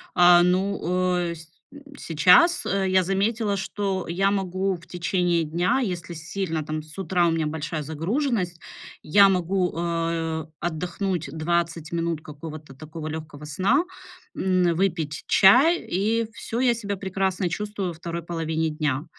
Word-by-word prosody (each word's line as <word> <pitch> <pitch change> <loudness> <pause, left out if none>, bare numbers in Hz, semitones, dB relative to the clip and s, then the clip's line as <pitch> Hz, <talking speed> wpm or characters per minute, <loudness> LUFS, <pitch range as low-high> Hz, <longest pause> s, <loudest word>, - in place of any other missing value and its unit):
А, 175 -1 +7
ну, 190 +3 +1 0.5
э, - - -5
сь 165 0 -13 0.3
м, 285 - -12 0.2
сейчас, 185 - +4
э, 195 -1 0
я 185 0 +4
заметила, 200 +3 0
что 190 -1 -2
я 190 +4 +1
могу 190 -1 -1
в 165 -1 -13
течение 175 -1 0
дня, 175 - +1
если 180 -7 -3
сильно 165 0 -3
там 155 +1 -4
с 155 +3 -12
утра 180 -1 +1
у - - +2
меня 160 -2 0
большая 155 0 -4
загруженность, 180 - -2 0.4
я 200 +6 +6
могу, 185 0 0
а, 165 -1 -2
отдохнуть 175 0 -3
20 165 0 -1
минут 170 -2 -2
какого-то 150 -1 -10
такого 155 +2 -8
лёгкого 155 -2 -7
сна, 195 - +2 0.5
м, 180 -2 +2
выпить 165 -5 -1
чай, 270 - +6
и 220 +5 -1
всё, 230 - -5
я 245 -2 +3
себя 205 -3 -4
прекрасно 190 -1 -1
чувствую 205 +2 -3
во 175 - -4
2 170 +1 -5
половине 160 -1 -2
дня. 150 -2 -2
175 Hz, 145 wpm, -24 LUFS, 160-195 Hz, 0.5 s, А